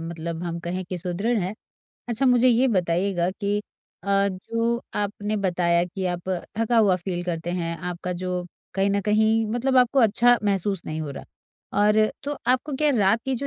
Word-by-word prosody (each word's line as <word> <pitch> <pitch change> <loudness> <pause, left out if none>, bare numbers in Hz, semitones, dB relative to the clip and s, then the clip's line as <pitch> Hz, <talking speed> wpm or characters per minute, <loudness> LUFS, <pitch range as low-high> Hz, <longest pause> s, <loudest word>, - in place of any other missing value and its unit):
मतलब 165 0 -5
हम 170 -1 -3
कहें 180 +2 -3
कि 180 0 -5
सुदृढ़ 195 +7 -1
है। 185 +2 -2 0.6
अच्छा 240 +3 0
मुझे 250 0 +5
ये 245 +2 +4
बताइएगा 180 -2 +1
कि 205 +1 -1 0.4
अ, 200 0 +3
जो 230 +5 -2
आपने 205 +1 -2
बताया 175 -3 +1
कि 185 +2 -5
आप 175 +1 -7 0.3
थका 230 +1 +2
हुआ 205 -4 +5
फील 175 0 -4
करते 170 -1 -3
हैं, 170 -2 -2
आपका 180 +1 -4
जो 180 0 -3 0.3
कहीं 195 0 +2
न 200 0 +1
कहीं 220 +2 +2
मतलब 260 +3 +1
आपको 250 +1 +4
अच्छा 240 +2 +5
महसूस 195 -2 0
नहीं 155 +1 -3
हो 150 -2 -4
रहा 135 - -8 0.6
और 210 0 +4 0.3
तो 290 +1 -3
आपको 255 +4 +1
क्या 300 +2 +2
रात 205 +3 +3
की 265 -1 -1
जो 275 +3 -3
200 Hz, 185 wpm, -24 LUFS, 175-230 Hz, 0.6 s, मुझे